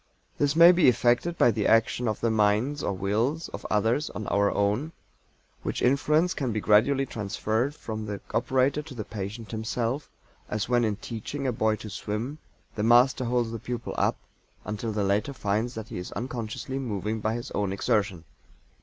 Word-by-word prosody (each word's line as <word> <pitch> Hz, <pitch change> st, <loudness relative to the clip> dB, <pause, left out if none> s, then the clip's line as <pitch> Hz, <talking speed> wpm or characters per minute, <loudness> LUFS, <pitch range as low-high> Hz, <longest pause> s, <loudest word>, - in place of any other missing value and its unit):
This 145 Hz, 0 st, +2 dB
may 170 Hz, +1 st, +9 dB
be 175 Hz, -6 st, +5 dB
effected 125 Hz, +8 st, +2 dB
by 120 Hz, -, +5 dB
the 105 Hz, -1 st, 0 dB
action 115 Hz, +2 st, +3 dB
of 110 Hz, -, -2 dB
the 115 Hz, -, +2 dB
minds 110 Hz, +7 st, +2 dB
or -, -, -1 dB
wills 110 Hz, -, -1 dB
of -, -, -7 dB
others 115 Hz, +8 st, +1 dB
on 105 Hz, -, -6 dB
our 100 Hz, 0 st, +3 dB
own, 105 Hz, +11 st, 0 dB, 0.7 s
which -, -, -3 dB
influence 150 Hz, +7 st, +3 dB
can 130 Hz, -4 st, -2 dB
be 110 Hz, -, -1 dB
gradually 120 Hz, +7 st, +3 dB
transferred 110 Hz, +4 st, -2 dB
from 110 Hz, -1 st, -6 dB
the 100 Hz, -1 st, -4 dB
operator 130 Hz, +4 st, +2 dB
to 150 Hz, -3 st, -11 dB
the 110 Hz, -, -4 dB
patient 105 Hz, +1 st, -6 dB
himself, 115 Hz, +5 st, -2 dB, 0.4 s
as 105 Hz, 0 st, -2 dB
when 120 Hz, -1 st, +3 dB
in 110 Hz, -2 st, +1 dB
teaching 120 Hz, +6 st, -6 dB
a 130 Hz, -, +2 dB
boy 110 Hz, -1 st, +1 dB
to 110 Hz, -, -9 dB
swim 115 Hz, +10 st, -4 dB, 0.3 s
the 105 Hz, -, -3 dB
master 120 Hz, +3 st, +4 dB
holds 120 Hz, -1 st, 0 dB
the 115 Hz, -, -5 dB
pupil 120 Hz, +1 st, -5 dB
up -, -, +1 dB, 0.5 s
until 105 Hz, +3 st, -3 dB
the 105 Hz, -1 st, -1 dB
latter 100 Hz, +8 st, 0 dB
finds 110 Hz, +1 st, -1 dB
that 110 Hz, -1 st, -6 dB
he -, -, -5 dB
is 90 Hz, -, -7 dB
unconsciously 125 Hz, +2 st, -4 dB
moving 110 Hz, -3 st, -3 dB
by 110 Hz, +1 st, -1 dB
his 120 Hz, -, -6 dB
own 100 Hz, -2 st, -1 dB
exertion. 100 Hz, -4 st, 0 dB
115 Hz, 180 wpm, -27 LUFS, 105-130 Hz, 0.7 s, may